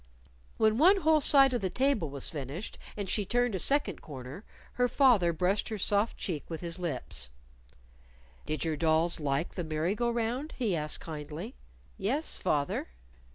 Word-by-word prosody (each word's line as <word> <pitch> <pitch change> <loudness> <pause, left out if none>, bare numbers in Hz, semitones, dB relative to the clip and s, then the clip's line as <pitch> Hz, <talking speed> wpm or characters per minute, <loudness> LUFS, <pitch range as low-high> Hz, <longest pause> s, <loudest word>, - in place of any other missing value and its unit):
When 220 +1 +3
one 380 +5 +6
whole 315 -1 +4
side 275 -2 +6
of 245 - 0
the 190 - -1
table 255 - +1
was 140 -1 -3
finished, 145 - -6 0.2
and 200 -2 -3
she 205 - 0
turned 245 +3 +1
a 190 - -1
second 285 - +2
corner, 135 - -9 0.3
her 245 0 +2
father 235 -9 +4
brushed 180 +5 0
her 220 - -3
soft 205 +2 +1
cheek 165 -7 -3
with 165 -2 -5
his 170 0 -4
lips. 100 - -4 1.2
"Did 155 +2 -2
your 160 -2 -1
dolls 160 +2 +2
like 145 +2 -1
the 175 - -3
merry 160 +3 -1
go 240 +2 0
round?" 235 +6 -2
he 220 -8 0
asked 150 -1 -1
kindly. 150 -1 -7 0.5
"Yes, 265 +11 -1
fath 145 -1 0
er." - - -3
185 Hz, 170 wpm, -30 LUFS, 155-240 Hz, 1.2 s, one